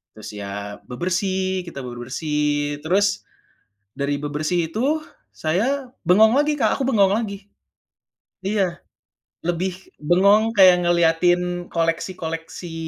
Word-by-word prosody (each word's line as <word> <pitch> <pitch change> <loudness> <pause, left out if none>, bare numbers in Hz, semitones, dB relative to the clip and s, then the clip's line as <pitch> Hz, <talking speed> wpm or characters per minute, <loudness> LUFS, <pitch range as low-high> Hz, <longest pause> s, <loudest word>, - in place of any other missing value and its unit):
Terus 110 0 -9
ya 100 0 -6
bebersih, 185 +6 -1
kita 140 -5 -7
bebersih. 145 +4 -2
Terus, 195 +5 +1 0.7
dari 140 +1 0
bebersih 155 +3 -2
itu, 280 - 0 0.3
saya 245 - -1 0.2
bengong 215 +5 +6
lagi, 295 +1 +2
Kak, 230 -1 +1
aku - - -1
bengong 200 -7 +4
lagi. 200 -2 -3 1.0
Iya. 195 -4 -1 0.6
Lebih 175 +2 -1 0.3
bengong 200 +7 +4
kayak 185 -4 +6
ngeliatin 175 +1 +2
koleksi-koleksi 165 0 -3
175 Hz, 105 wpm, -22 LUFS, 155-200 Hz, 1.0 s, bengong